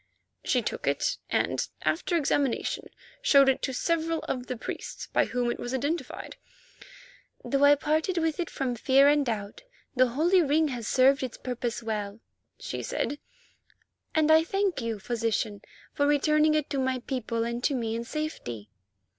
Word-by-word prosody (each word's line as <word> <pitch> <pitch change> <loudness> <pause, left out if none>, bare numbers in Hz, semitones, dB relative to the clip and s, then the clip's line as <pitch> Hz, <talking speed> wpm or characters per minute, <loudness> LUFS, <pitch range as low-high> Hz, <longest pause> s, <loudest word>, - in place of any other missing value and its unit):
She - - +1
took - - -4
it - - +1
and, - - 0 0.2
after 340 +1 +1
examination, 280 -4 0 0.3
showed 280 - +6
it 270 - +2
to 265 - -1
several 330 +4 0
of 250 -1 -4
the 255 - -4
priests, - - -6
by - - +4
whom 245 -1 -1
it - - -5
was 245 +2 -3
identified. 285 +1 -3 1.1
"Though 275 0 +1
I 285 0 +8
parted 310 +5 0
from 335 -2 +1
it 320 0 -1 0.3
with 240 - -5
fear 275 +3 +5
and 290 0 +4
doubt, 215 - -4 0.3
the 255 0 +5
holy 330 +9 +3
ring 310 0 +2
has 240 -4 -5
served 270 +2 +4
its 255 -3 -4
purpose 245 -1 -4
well," 210 -1 -3 0.4
she - - -5
said, 290 - -2 1.0
"and 315 0 +4
I 320 0 +7
thank 390 -3 -1
you, 230 -2 -2
Physician, 220 -1 -2 0.3
for 285 - +1
returning 305 +1 +3
it 305 -1 0
to 275 - 0
my 260 0 0
people 235 -3 -2
and 235 +1 -3
to 285 - +2
me 225 -3 -2
in 230 - -3
safety." 230 - -5
270 Hz, 165 wpm, -27 LUFS, 240-310 Hz, 1.1 s, I